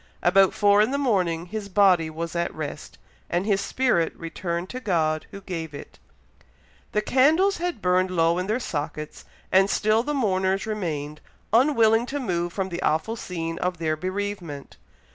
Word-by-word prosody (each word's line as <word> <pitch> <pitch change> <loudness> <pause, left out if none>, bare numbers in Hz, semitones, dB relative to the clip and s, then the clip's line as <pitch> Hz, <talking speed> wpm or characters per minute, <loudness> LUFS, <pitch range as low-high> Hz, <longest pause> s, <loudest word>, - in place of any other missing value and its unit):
About 190 +2 +5
four 205 0 +5
in 215 - +3
the 280 - -1
morning 180 -11 0
his 205 +2 -6
body 185 -5 +4
was 165 +1 -5
at 170 0 0
rest, 150 -1 -7 0.3
and 175 +2 0
his 200 -2 +1
spirit 245 -11 +1
returned 170 +1 -4
to 255 - -5
God 160 -8 0
who 200 - -10
gave 165 -6 -5
it. - - -11 0.9
The 210 - 0
candles 315 - +3
had 350 -9 -3
burned 185 +1 +2
low 170 -1 +2
in 185 - -3
their 220 +4 0
sockets, 150 - -5 0.3
and 190 +1 +5
still 215 +2 +2
the 295 +4 -2
mourners 190 -5 +1
remained, 155 -9 -4 0.3
unwilling 230 -2 +4
to 285 +2 -3
move 175 -8 -2
from 190 +1 -3
the 175 0 -5
awful 160 +9 0
scene 165 -6 -5
of 180 0 -1
their 160 -1 -1
bereavement. 185 -4 -5
185 Hz, 165 wpm, -25 LUFS, 165-215 Hz, 0.9 s, About